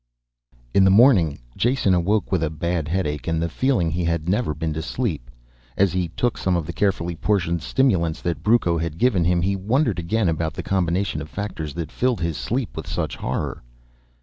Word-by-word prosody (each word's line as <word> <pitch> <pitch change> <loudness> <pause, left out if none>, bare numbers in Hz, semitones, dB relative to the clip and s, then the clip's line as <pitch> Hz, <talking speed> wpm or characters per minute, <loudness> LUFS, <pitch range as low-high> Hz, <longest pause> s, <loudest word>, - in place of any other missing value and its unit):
In 100 - +5
the 95 - +6
morning 95 - +5 0.2
Jason 120 -5 +2
awoke 95 +4 +1
with 95 -3 +1
a 80 - 0
bad 80 0 -2
headache 75 -6 -2
and 80 -1 0
the 85 - 0
feeling 95 -3 +1
he 85 +2 -1
had 85 -1 -1
never 95 -4 0
been 80 +1 -2
to 80 - -3
sleep. 80 - -3 0.5
As 95 -3 +3
he 90 -1 0
took 120 +8 -1
some 95 -1 +1
of 85 -3 -1
the 85 - -5
carefully 90 -4 0
portioned 85 -2 0
stimulants 85 - +1
that 85 -1 -2
Brucco 105 -7 +2
had 80 -1 -3
given 100 -6 +2
him, 85 0 +2
he 100 +2 +1
wondered 110 - +1
again 95 +5 0
about 80 -2 -1
the - - -4
combination 90 -3 0
of 75 - -8
factors 80 -8 -5
that 85 -2 -4
filled 125 -7 0
his 85 -2 -1
sleep 120 - -3
with - - -6
such - - -3
horror. - - -3
85 Hz, 200 wpm, -23 LUFS, 80-100 Hz, 0.5 s, the